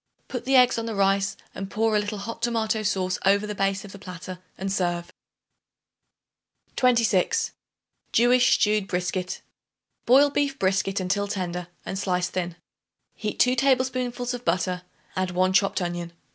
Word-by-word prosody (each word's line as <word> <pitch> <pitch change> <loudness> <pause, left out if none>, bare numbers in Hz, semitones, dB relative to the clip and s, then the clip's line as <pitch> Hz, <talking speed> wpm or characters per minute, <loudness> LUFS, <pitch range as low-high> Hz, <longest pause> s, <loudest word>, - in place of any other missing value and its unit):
Put 250 - -5
the 270 +1 +2
eggs 250 -2 +5
on 230 - -4
the 225 - -3
rice 195 0 +2 0.2
and 195 0 -6
pour 220 +1 +1
a - - +4
little 210 +1 -3
hot 225 +3 -6
tomato 225 -2 0
sauce 190 -3 -1
over 200 +2 +3
the 210 - -4
base 195 0 -1
of 200 - -10
the 200 - -11
platter 180 -1 -8 0.2
and 195 0 -2
serve. 175 -2 -1 1.6
26. 235 - +2 0.6
Jewish 245 +1 +5
Stewed 210 -2 +2
Brisket. 180 +1 -2 0.6
Boil 275 +4 +6
beef 280 -1 0
brisket 190 0 +1
until 195 +2 0
tender, 180 -3 -3 0.2
and 190 - -4
slice 180 -2 0
thin. 175 -2 -3 0.6
Heat 210 -1 -4
2 250 +1 +4
tablespoonfuls 255 -2 +1
of 245 0 -6
butter; 180 0 0 0.3
add 185 0 0
1 185 +1 +1
chopped 195 -1 +2
onion. 175 -1 -4
200 Hz, 155 wpm, -25 LUFS, 185-235 Hz, 1.6 s, Boil